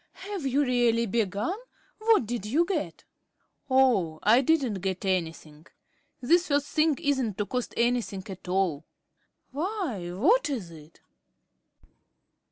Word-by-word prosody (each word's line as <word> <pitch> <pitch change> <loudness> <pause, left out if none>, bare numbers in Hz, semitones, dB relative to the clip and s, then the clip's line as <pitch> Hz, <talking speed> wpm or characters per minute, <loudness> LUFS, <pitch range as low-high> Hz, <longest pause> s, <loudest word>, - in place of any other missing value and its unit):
"Have 390 -8 -5
you 275 +3 +2
really 240 -3 +2
begun? 220 - -1 0.4
What 435 - +3
did 230 -2 -4
you 305 +10 +2
get?" 305 - -3 0.7
"Oh, 230 -12 +3
I 230 +5 +5
didn't 270 -8 +1
get 190 0 -3
anything. 165 -4 -3 0.5
This 340 +8 +3
first 285 -1 0
thing 310 -2 +2
isn't 265 -8 -1
to 205 - -1
cost 250 +3 -4
anything 235 -5 0
at 190 -2 -9
all." 180 -5 0 0.7
"Why, 295 - -3
what 335 - +3
is 220 -12 -4
it?" 155 -1 -15
235 Hz, 125 wpm, -27 LUFS, 190-285 Hz, 0.7 s, I